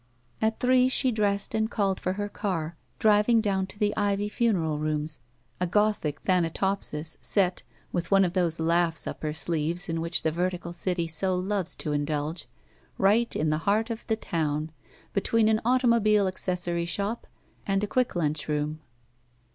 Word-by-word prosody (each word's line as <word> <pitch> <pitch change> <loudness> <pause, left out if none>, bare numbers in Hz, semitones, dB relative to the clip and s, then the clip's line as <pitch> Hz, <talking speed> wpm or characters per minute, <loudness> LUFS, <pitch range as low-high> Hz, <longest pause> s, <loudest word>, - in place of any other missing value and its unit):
At 220 0 +1
three 255 0 +4
she 260 0 +2
dressed 205 -2 0
and 220 0 +1
called 195 -5 0
for 185 - -1
her 205 +1 -3
car, 170 -6 -3 0.2
driving 215 +2 +4
down 195 -3 0
to 205 - -9
the 210 0 +1
Ivy 205 0 0
Funeral 185 -11 0
Rooms, 155 -1 -2 0.4
a 180 - 0
Gothic 210 -5 +1
Thana 180 -3 +2
topsis, 165 -4 -2
set, 185 -3 +1 0.3
with 170 -2 -2
one 195 -1 +5
of 175 - -2
those 175 -3 +1
laughs 165 0 +2
up - - -6
her 155 - -1
sleeves 165 +3 -1
in 165 -1 -2
which 170 +1 0
the 160 - +2
vertical 175 +1 -2
city 175 0 -1
so 175 +4 0
loves 185 0 -1
to 150 - -3
indulge, 150 +2 -2 0.5
right 215 +5 +3
in 155 0 +1
the 155 - 0
heart 220 +3 +2
of 225 - -6
the 220 - +2
town, 155 -6 -2 0.4
between 215 +2 +2
an 220 0 +2
automobile 230 -4 +3
acces 185 -1 -2
sory 170 -1 -1
shop 200 +6 -3 0.4
and 195 0 +1
a - - 0
quick 250 0 0
lunch 155 -3 -1
room. 150 +1 -1
185 Hz, 170 wpm, -27 LUFS, 165-210 Hz, 0.5 s, one